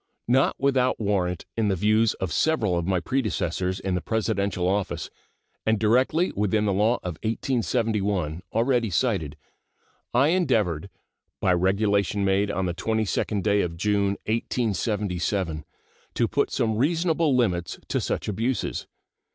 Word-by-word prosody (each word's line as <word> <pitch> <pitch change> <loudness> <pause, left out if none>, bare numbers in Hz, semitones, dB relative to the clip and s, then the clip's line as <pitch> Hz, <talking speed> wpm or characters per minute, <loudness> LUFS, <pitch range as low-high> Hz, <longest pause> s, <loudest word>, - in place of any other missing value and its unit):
Not 130 +3 +3
without 130 -2 +1
warrant 95 -5 -1
in 110 -2 +1
the 100 - +2
views 110 +4 +2
of 90 -5 -3
several 115 - +1
of 85 0 -1
my 95 -2 +2
predecessors 95 -4 -1
in 95 -1 -2
the 90 - -1
Presidential 100 -4 -1
office, 100 +1 -1 0.5
and 110 0 +2
directly 130 - +2
within 105 +1 0
the 100 - +1
law 105 +5 +3
of 90 -4 -5
1871, 105 - -1
already 115 0 +1
cited, 85 - 0 0.7
I 130 +5 +4
endeavored, 105 - +1 0.5
by 90 - +3
regulation 100 +2 +1
made 100 +1 +2
on 95 -1 -1
the 90 - -1
22d 105 +1 -1
day 100 -1 +3
of 85 -1 -3
June, 100 +1 +1
1877, 100 -7 -1 0.5
to 115 - +2
put 140 - 0
some 110 -4 0
reasonable 160 +1 +2
limits 90 - 0
to - - 0
such - - -2
abuses. 115 +5 -2
105 Hz, 135 wpm, -25 LUFS, 95-115 Hz, 0.7 s, I